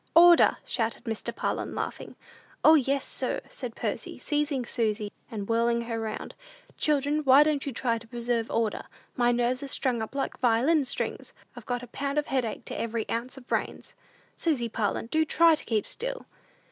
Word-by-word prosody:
"Order!" 345 0 +7
shouted 230 -1 -1
Mr. 225 -3 -3
Parlin, - - -2
laughing. - - -5 0.5
"O, 315 - +8
yes, 275 -2 +2
sir," - - -1
said - - -6
Percy, - - -4
seizing 295 -4 -1
Susy 215 -3 -1 0.2
and 205 -3 -5
whirling 235 +1 +2
her 230 -1 -3
round. 220 -1 -5 0.4
"Children, 295 0 +1
why 280 -1 +7
don't 300 -2 0
you - - -1
try 230 -1 -1
to - - -15
preserve 235 -1 -2
order? 225 -2 -1 0.3
My 240 -1 +3
nerves 245 +2 +1
are 280 - -5
strung 255 -3 0
up 220 +5 -6
like 275 - -2
violin 260 +6 +3
strings! - - -3 0.2
I've 240 -3 -11
got 245 0 -2
a - - -8
pound 280 +4 -3
of 300 - +2
headache 255 -5 -2
to - - -5
every 230 -1 -2
ounce 245 +4 -3
of 260 - -12
brains. - - -3 0.4
Susy 270 -9 0
Parlin, 220 -1 -1
do 315 +7 +1
try 330 +1 +5
to 310 - -2
keep 215 -3 0
still!" - - -4
245 Hz, 180 wpm, -27 LUFS, 230-290 Hz, 0.5 s, O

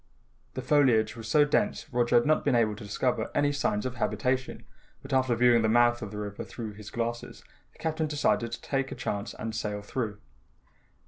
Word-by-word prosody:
The 130 - -4
foliage 130 -6 +3
was 115 -2 -8
so 145 +6 +5
dense, 205 +8 0
Roger 120 0 +2
had 120 - +5
not 155 +1 +2
been 140 -4 +2
able 110 -3 +2
to 105 - -10
discover 110 +2 -1
any 145 0 +3
signs 130 -6 -1
of 130 0 -4
habitation, 125 +4 -1 0.4
but 135 0 -6
after 130 -2 +2
viewing 120 0 +5
the 110 - +2
mouth 120 +1 +4
of 105 - -5
the 105 - -8
river 105 -1 -5
through 115 -3 -7
his 105 0 -10
glasses, 120 +1 -4 0.3
the - - -25
Captain 160 -1 -1
decided 145 -6 0
to 120 - -6
take 135 -1 -1
a - - -4
chance, 100 +2 -4
and 110 0 -5
sail 105 -2 -3
through. 105 -2 -3
120 Hz, 200 wpm, -28 LUFS, 110-130 Hz, 0.4 s, so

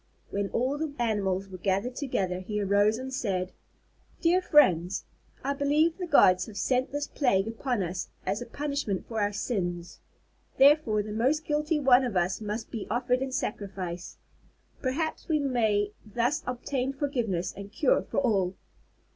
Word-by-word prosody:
When 200 0 -1
all 260 +5 0
the 310 -2 -3
animals 200 -5 0
were 185 -1 -9
gathered 200 +7 0
together 190 -10 -1
he 210 +3 -3
arose 205 +2 +3
and 260 +1 -6
said: 190 -7 -1 0.7
"Dear 350 +2 +3
friends, 190 - +3 0.4
I 280 +2 0
believe 295 +4 +2
the 360 - -3
gods 185 - +5
have 210 -2 -9
sent 255 +5 +1
this 290 +1 -2
plague 225 -11 +1
upon 230 -1 -1
us 180 +1 -4 0.2
as 195 +4 -1
a 245 - -6
punishment 280 -9 -3
for 225 -2 -2
our 205 0 +1
sins. 175 -5 -3 0.6
Therefore, 270 -7 +5
the 210 - -7
most 270 +8 +1
guilty 300 +1 0
one 265 -2 +5
of 235 -7 -1
us 180 +4 0
must 215 +2 -4
be 225 - -5
offered 250 +2 +1
in 265 0 -2
sacrifice. 190 -7 -4 0.6
Perhaps 300 +5 -2
we 315 - +3
may 220 -7 +1
thus 240 +8 0
obtain 255 +1 -2
forgiveness 240 - -1
and 200 +1 -9
cure 260 +4 +2
for - - -7
all. 195 -8 +2
230 Hz, 160 wpm, -28 LUFS, 195-275 Hz, 0.7 s, gods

